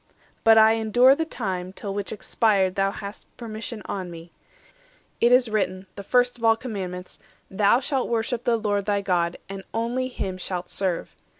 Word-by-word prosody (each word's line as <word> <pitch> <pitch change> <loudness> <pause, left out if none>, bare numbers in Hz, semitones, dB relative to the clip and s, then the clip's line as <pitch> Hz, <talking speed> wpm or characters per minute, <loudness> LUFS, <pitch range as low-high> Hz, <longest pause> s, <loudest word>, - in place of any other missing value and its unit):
But 225 0 +7
I 220 0 +7
endure 225 +4 +5
the 320 +3 -1
time, 185 - -4
till 200 0 -5
which 200 0 -3
expired 200 -3 +1
Thou 195 0 +1
hast 200 +1 -8
permission 220 -1 -6
on 185 -3 -4
me. 170 0 -11 0.9
It 240 - +4
is 250 0 +5
written, 195 -3 -1
The 200 - -6
first 245 +4 +1
of - - -12
all 225 0 +5
commandments, 190 -7 -6 0.3
'Thou 200 +4 +4
shalt 265 -1 -1
worship 230 +1 -1
The 240 -2 +2
Lord 205 -2 -1
thy 205 -1 +1
God, 175 -3 0
and 195 0 -7
only 240 +3 -1
Him 190 -7 -5
shalt 180 -1 -4
serve. 185 -3 -2
210 Hz, 175 wpm, -24 LUFS, 190-235 Hz, 0.9 s, But